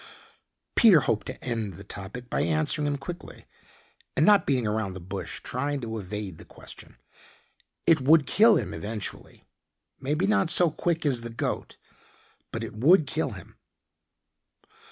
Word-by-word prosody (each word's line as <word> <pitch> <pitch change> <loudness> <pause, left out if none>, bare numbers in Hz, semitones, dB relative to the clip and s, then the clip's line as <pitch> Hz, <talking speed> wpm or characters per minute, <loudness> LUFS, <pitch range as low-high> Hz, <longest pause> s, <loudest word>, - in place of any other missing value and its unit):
Peter 200 - +7
hoped 105 -6 -1
to - - -8
end 115 -5 -3
the 100 - -11
topic 100 +5 -9
by - - -1
answering 80 - 0
him 145 -1 -1
quickly 175 +5 -9 0.7
and - - +4
not 205 -1 +5
beating 130 -4 +1
around 105 -2 -1
the 95 - -7
bush 95 +2 -6
trying 140 +3 -2
to 115 -3 -5
evade 100 -3 -6
the - - -11
question. - - -13 0.9
"It 160 -3 +4
would 150 +2 +5
kill 220 - +5
him 100 - -2
eventually. 105 +6 -6 0.6
Maybe 150 +7 -1
not 205 -5 +2
so 175 -2 +6
quick 165 +1 -2
as 130 -5 +1
the 115 - -6
goat, 115 - -4 0.7
but - - -4
it - - -6
would 150 - +4
kill 135 - -2
him." - - -13
125 Hz, 155 wpm, -26 LUFS, 105-155 Hz, 0.9 s, Peter